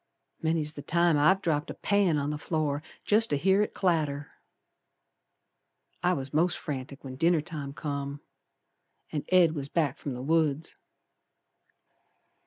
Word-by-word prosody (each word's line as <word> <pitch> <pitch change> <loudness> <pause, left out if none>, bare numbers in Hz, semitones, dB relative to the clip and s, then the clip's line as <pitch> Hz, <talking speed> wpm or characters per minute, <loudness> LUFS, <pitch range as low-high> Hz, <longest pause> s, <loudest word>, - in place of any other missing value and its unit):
Many's 160 -2 0
the 145 - -7
time 170 +2 +3
I've 190 +7 +4
dropped 150 -3 0
a - - -5
pan 200 -6 +2
on 145 0 -1
the 150 - -4
floor 150 -3 -1 0.2
Jest 220 +2 +3
to 145 - +1
hear 190 +6 +3
it 210 - -2
clatter. 150 -6 0 1.7
I 180 +1 +3
was 135 -3 -4
most 170 +4 +2
frantic 140 -1 -5
when 130 -1 -7
dinner 165 +1 +3
time 150 -3 -6
come 140 -1 -4 0.9
An' 150 - -3
Ed 180 -3 +5
was 140 -3 -4
back 150 -5 0
from 140 -3 -4
the 125 - -6
woods. 155 0 +1
150 Hz, 145 wpm, -28 LUFS, 140-170 Hz, 1.7 s, Ed